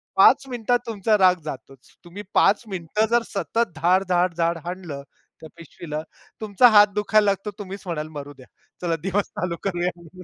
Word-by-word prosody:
5 - - +6
मिनिटात 245 0 0
तुमचा 215 -1 +1
राग 185 -2 +5
जातोच. 135 -2 -10
तुम्ही 185 +4 -9
5 205 +4 +3
मिनिटं 190 +2 -1
जर 235 0 +3
सतत 230 +2 -1
धाड, 180 +4 +2
धाड, 180 0 +2
धाड, 170 0 +1
हाणलं 175 -6 -6 0.4
त्या 160 - -10
पिशवीला 160 -1 -7 0.4
तुमचा 215 +3 +5
हात 210 -2 +7
दुखायला 210 0 +2
लागतो 200 +1 -1
तुम्हीच 195 0 -7
म्हणाल, 160 -4 -4
"मरू 145 0 -8
द्या, 130 -2 -16 0.4
चला 170 -2 0
दिवस 195 +1 0
चालू 180 -2 -2
करूया, 180 -2 -1
म्हणून" 175 +2 -14
185 Hz, 170 wpm, -23 LUFS, 165-205 Hz, 0.4 s, हात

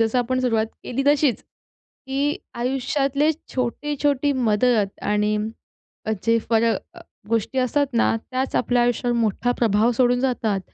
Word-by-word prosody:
जसं 225 +2 +2
आपण 255 +1 0
सुरुवात 225 -3 +1 0.2
केली 255 +2 -2
तशीच, 290 -3 +3 0.4
की 270 +1 -7 0.4
आयुष्यातले 275 +4 0 0.2
छोटी-छोटी 285 +2 0 0.2
मदत 210 -2 +1
आणि 210 0 +1 0.9
जे 230 0 +3
फर 225 -1 +4 0.3
अ, - - -12 0.3
गोष्टी 230 +3 -1
असतात 270 +3 +1
ना - - +3 0.2
त्याच 260 +1 -2
आपल्या 245 0 +2
आयुष्यावर 240 0 0
मोठा 230 +2 +1
प्रभाव 220 0 +3
सोडून 245 +1 +2
जातात 230 -6 0
245 Hz, 130 wpm, -22 LUFS, 225-270 Hz, 0.9 s, फर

